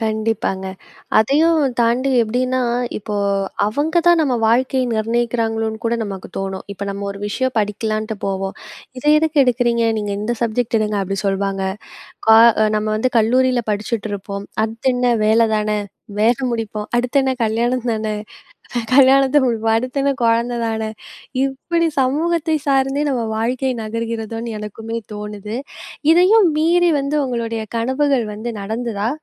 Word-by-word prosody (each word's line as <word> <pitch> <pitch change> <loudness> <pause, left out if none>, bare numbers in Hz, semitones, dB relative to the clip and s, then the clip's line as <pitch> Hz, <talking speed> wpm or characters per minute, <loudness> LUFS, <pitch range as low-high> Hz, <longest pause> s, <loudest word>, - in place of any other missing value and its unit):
கண்டிப்பாங்க. 220 -3 -1 0.5
அதையும் 310 +9 +3 0.2
தாண்டி 240 +4 +2
எப்படீன்னா, 255 +3 0 0.4
இப்போ 210 0 -5 0.5
அவங்க 290 +10 0
தான் 345 -1 +6
நம்ம 280 -5 +1
வாழ்க்கையை 255 +3 +2
நிர்ணயிக்கிறாங்களோன்னு 225 0 -1
கூட 230 +1 +1
நமக்கு 195 -2 -7
தோணும். 195 -1 -4
இப்ப 200 0 -6
நம்ம 200 0 -5
ஒரு 200 - -7
விஷயம் 260 +5 -1
படிக்கலான்ட்டு 215 +1 -2
போவோம். 195 0 -3 0.4
"இதை 295 +4 +2
எதுக்கு 315 -1 0
எடுக்கறீங்க? 240 -2 +1
நீங்க 205 -1 -3
இந்த 225 +3 -1
சப்ஜெக்ட் 235 +1 0
எடுங்க." 210 -1 -1
அப்படி 195 0 -3
சொல்வாங்க. 195 0 -1 0.7
கா 220 0 +8 0.4
நம்ம 215 0 -1
வந்து 255 +4 0
கல்லூரில 250 +2 +3
படிச்சுட்டுருப்போம். 205 -2 -4 0.2
அடுத்து 225 +3 -1
என்ன 250 0 +1 0.2
வேலை 225 +2 +4
தான, 215 0 -1 0.5
வேலை 240 +5 +2
முடிப்போம். 215 -2 -4
அடுத்தென்ன 265 +2 +1
கல்யாணம் 235 +3 0
தான, 220 -1 -2 0.7
க 240 - +1
கல்யாணத்தை 270 +1 +6
முடிப்போம். 225 -1 +1
அடுத்தென்ன 275 +4 0
கொழந்தை 235 +1 +2
தான. 220 -1 -2 0.6
இப்படி 330 +5 -1
சமூகத்தை 320 +4 +1
சார்ந்தே 270 +1 +2
நம்ம 245 -3 -1
வாழ்க்கை 255 +4 0
நகர்கிறதோன்னு 225 0 -4
எனக்குமே 225 +2 -5
தோணுது. 210 +1 -6 0.6
இதையும் 375 +4 +5
மீறி 340 +2 +3
வந்து 280 +2 -1
உங்களுடைய 230 -3 -3 0.2
கனவுகள் 260 +1 +1
வந்து 220 +3 -5
நடந்துதா? 220 0 -2
230 Hz, 130 wpm, -19 LUFS, 215-260 Hz, 0.7 s, கா